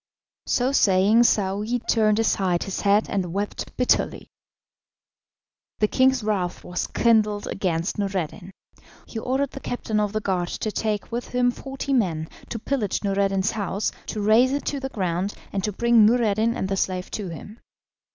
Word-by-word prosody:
So 255 +2 +1
saying 210 -1 +4
Saouy 210 +3 +1
turned 215 -2 +3
aside 190 -5 +1
his 195 - -4
head 205 +1 +3
and 185 -4 -2
wept 200 +3 -4
bitterly. 250 - +1 1.5
The 210 - +2
king's 260 0 +3
wrath 190 -4 -2
was 180 0 -3
kindled 215 -3 +2
against 175 0 -2
Noureddin. 190 -1 -3 0.6
He 225 - -6
ordered 265 +4 -1
the - - -7
captain 225 -4 -2
of 210 -1 0
the 215 - -1
guard 185 -4 -1
to 215 - -3
take 210 0 -2
with 240 +1 -3
him 245 0 +2
forty 270 +2 -5
men, 165 -10 0 0.2
to 235 - -3
pillage 225 -4 -2
Noureddin's 195 0 +1
house, 200 -1 -2 0.2
to 215 - -3
rase 230 +6 +4
it 285 - -2
to 285 - -2
the 265 0 -4
ground, 185 -3 -2 0.2
and 195 - -1
to 210 - 0
bring 235 +2 +4
Noureddin 225 0 +3
and 190 - -2
the 195 0 -1
slave 185 -1 -2
to 200 -4 -4
him. 205 +7 -9
210 Hz, 160 wpm, -24 LUFS, 195-235 Hz, 1.5 s, saying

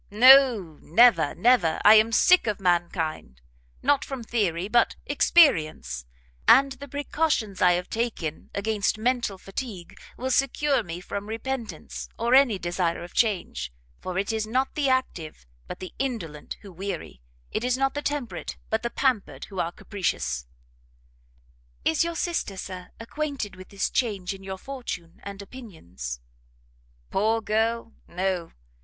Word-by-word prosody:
"No, 235 - +6
never, 235 +8 +4
never! 225 -9 +3
I 210 - +10
am 220 +1 +5
sick 360 +4 +5
of 210 - -1
mankind, 170 - -1 0.4
not 285 -1 +3
from 265 -3 -6
theory, 195 -6 -1
but 235 +2 +3
experience; 160 - +3 0.4
and 275 +2 +7
the 275 +2 -8
precautions 285 - -1
I 180 -1 +6
have 180 +1 -2
taken 220 -9 -3
against 210 +1 0
mental 235 -3 0
fatigue, 195 -2 -7 0.2
will 260 +1 -2
secure 275 +2 +2
me 175 +1 -7
from 200 +3 -6
repentance, 225 -5 -5
or 235 +2 +1
any 260 -6 +6
desire 175 -1 -1
of 175 - -11
change; 185 - 0 0.3
for 185 -1 -4
it 200 +3 0
is 220 -1 -1
not 260 +4 0
the 285 -3 +1
active, 175 - -2 0.2
but - - -6
the 185 - -8
indolent 195 - -4
who 200 - -10
weary; 180 - -6 0.3
it 220 - -2
is 250 0 +1
not 270 0 +1
the 290 - -3
temperate, 290 -5 -4
but 220 0 +1
the 235 - -2
pampered 255 -5 -1
who 195 -3 -6
are 170 - 0
capricious." 180 - -3 1.4
"Is 160 - +3
your 340 0 -3
sister, 330 - -2
Sir, 185 -1 -7
acquainted 255 -4 -4
with 185 0 -12
this 195 -1 -1
change 200 -6 -1
in 195 - -11
your 190 0 -5
fortune 210 -9 -7
and 200 0 -8
opinions?" 90 - -8 0.9
"Poor 220 +3 +2
girl, 225 +1 -1
no! 180 -1 -2
215 Hz, 145 wpm, -26 LUFS, 180-255 Hz, 1.4 s, I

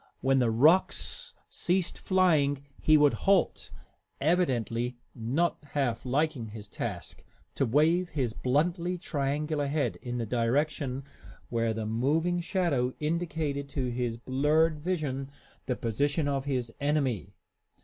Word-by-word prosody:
When 135 0 +3
the 120 -2 +3
rocks 150 +12 +2
ceased 180 0 0
flying 150 -7 +2 0.2
he 155 0 +6
would 145 -1 +5 0.2
halt, 195 -4 +2 0.5
evidently 125 -7 +1 0.2
not 135 +9 -1
half 130 -4 -1
liking 135 -3 0
his 105 -1 -9
task, - - -5 0.3
to 135 - 0
wave 165 +8 +3
his 130 -8 -1
bluntly 170 +8 0
triangular 145 -3 -1
head 140 -4 -1
in 125 -1 -5
the 115 - -2
direction 130 +4 0 0.5
where 115 -1 0
the 110 0 -3
moving 150 +11 +1
shadow 165 -9 0
indicated 155 -3 -2
to 130 -3 -2
his 120 -1 -2
blurred 150 +6 +2
vision 150 -6 -2 0.4
the 125 - 0
position 145 +8 0
of 140 -1 -1
his 125 -5 -2
enemy. 135 - 0
140 Hz, 125 wpm, -29 LUFS, 125-160 Hz, 0.5 s, he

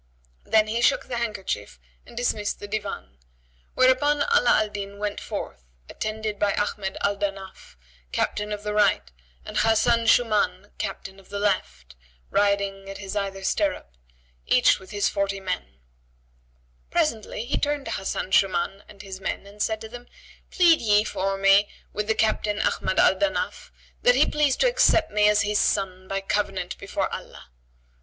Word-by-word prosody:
"[FN#81] - - -23
Then 215 -1 +5
he 230 +2 -1
shook - - +3
the 245 - -3
handkerchief[FN#82] 195 - -4 0.3
and 235 - -14
dismissed 215 -4 -1
the 205 - -7
Divan, 200 - -5 0.6
whereupon 275 +3 +4
Ala 245 - +5
al 215 - -6
Din 200 -1 -6
went 205 0 -3
forth, - - -6 0.3
attended 215 -1 -4
by 205 -1 +1
Ahmad 200 -2 -2
al 200 0 +1
Danaf, 195 - -6 0.4
captain 210 0 -1
of 210 0 -4
the 210 0 -3
right, 200 - +2 0.3
and - - -5
Hasan 230 +1 +3
Shъmбn, 210 -5 +2
captain 195 -1 -5
of 190 - -20
the 200 - -5
left, 65 - -2 0.4
riding 200 -1 0
at 195 - -7
his 195 0 -7
either 195 -1 -3
stirrup, 290 - -1 0.5
each - - +4
with 190 - -14
his 205 -2 0
forty 200 -1 -1
men.[FN#83] 180 - -4 1.1
Presently, 235 -9 -1
he 265 - -1
turned 290 -1 -1
to - - -4
Hasan 190 0 -3
Shuman 195 0 +2
and 200 -1 -12
his 190 -1 -8
men 190 - -3
and 205 +1 -11
said 220 0 0
to 220 - -7
them, 245 +2 -11 0.4
"Plead 345 -3 +4
ye 210 -2 +4
for 195 -2 -2
me 195 +1 +5 0.2
with 210 +1 -3
the 220 - +2
Captain 215 -1 0
Ahmad 190 - 0
al 190 - +5
Danaf 300 0 -2 0.3
that - - +5
he - - +5
please 295 -3 +1
to - - +3
accept 480 - +3
me 210 0 +4
as 210 0 +3
his 210 0 +1
son 185 -2 0
by 195 0 -2
covenant 195 -2 -2
before - - -2
Allah." 65 - -9
205 Hz, 165 wpm, -25 LUFS, 195-220 Hz, 1.1 s, Then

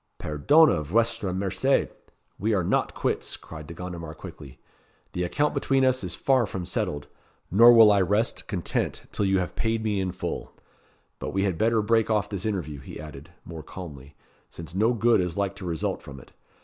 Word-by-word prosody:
"Perdone, 80 - +3
vuestra 100 +3 0
merced! 95 0 +1 0.5
we 110 +2 +1
are 95 - +1
not - - 0
quits," - - -2
cried 75 -2 -10
De 85 - -9
Gondomar 85 -3 -7
quickly. 70 -3 -11 0.6
"The 90 - -1
account 145 +13 0
between 135 -1 +2
us 130 0 +1
is - - -4
far 130 -5 +2
from 95 -2 -5
settled; 90 - -2 0.5
nor 115 +6 +8
will 115 -3 +8
I 100 -1 +4
rest 105 +5 0
content 95 -6 -2
till 100 - 0
you 95 0 +2
have 90 -1 -2
paid 115 0 -1
me 105 -3 0
in 95 -1 -2
full. 90 - -5 0.7
But - - -5
we 95 0 +1
had 95 -4 0
better 110 +4 +2
break 115 +1 +2
off 105 -3 +1
this 100 0 -3
interview," 85 -9 -3
he 70 - -10
added, 75 0 -10 0.2
more 80 -2 -8
calmly, 75 -5 -10 0.3
"since 85 0 -10
no 110 +6 +2
good 115 -2 +3
is 90 -1 -3
like 100 -1 -1
to 95 - -8
result 85 -3 -2
from 70 -1 -10
it. - - -17
95 Hz, 190 wpm, -26 LUFS, 85-110 Hz, 0.7 s, nor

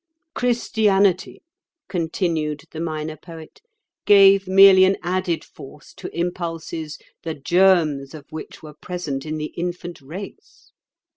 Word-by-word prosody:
"Christianity," 205 -6 +1 0.4
continued 160 -4 -2
the 160 - -8
Minor 155 -1 -4
Poet, 165 - -13 0.5
"gave 195 -1 +6
merely 190 0 +7
an 190 +1 +3
added 180 -1 -1
force 145 +2 -14
to - - -8
impulses 165 -3 -4 0.2
the 160 -1 -5
germs 160 -3 +2
of 145 -3 -11
which 155 0 -9
were 150 -1 -10
present 155 -4 -5
in 155 0 -3
the 155 0 -5
infant 175 -1 -5
race. 175 +9 -11
170 Hz, 120 wpm, -21 LUFS, 155-190 Hz, 0.5 s, merely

